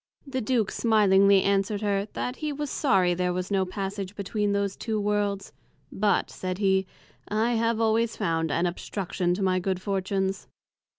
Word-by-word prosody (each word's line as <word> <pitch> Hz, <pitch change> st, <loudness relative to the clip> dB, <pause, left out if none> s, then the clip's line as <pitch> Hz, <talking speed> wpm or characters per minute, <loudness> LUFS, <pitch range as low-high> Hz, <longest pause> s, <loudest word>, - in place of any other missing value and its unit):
The 265 Hz, -2 st, -3 dB
Duke 225 Hz, -2 st, 0 dB
smilingly 200 Hz, -3 st, +4 dB
answered 200 Hz, +1 st, +1 dB
her, 200 Hz, 0 st, 0 dB
That 250 Hz, +1 st, -3 dB
he 305 Hz, -1 st, -3 dB
was 290 Hz, 0 st, -4 dB
sorry 190 Hz, -, +2 dB
there 180 Hz, 0 st, 0 dB
was 180 Hz, +2 st, -3 dB
no 190 Hz, -1 st, +2 dB
Passage 195 Hz, +1 st, -5 dB
between 205 Hz, +1 st, -1 dB
those 200 Hz, -1 st, 0 dB
two 220 Hz, -2 st, -2 dB
Worlds; 205 Hz, -1 st, -1 dB, 0.4 s
but, 205 Hz, +1 st, +1 dB
said 185 Hz, -1 st, -4 dB
he, 190 Hz, -1 st, +2 dB, 0.4 s
I 220 Hz, +3 st, +1 dB
have 230 Hz, 0 st, +1 dB
always 225 Hz, 0 st, +1 dB
found 165 Hz, -5 st, 0 dB
an 170 Hz, -, +1 dB
Obstruction 180 Hz, 0 st, -2 dB
to 200 Hz, -, -3 dB
my 185 Hz, -1 st, +2 dB
Good 185 Hz, 0 st, -1 dB
Fortunes. 195 Hz, 0 st, -2 dB
200 Hz, 165 wpm, -26 LUFS, 190-215 Hz, 0.4 s, smilingly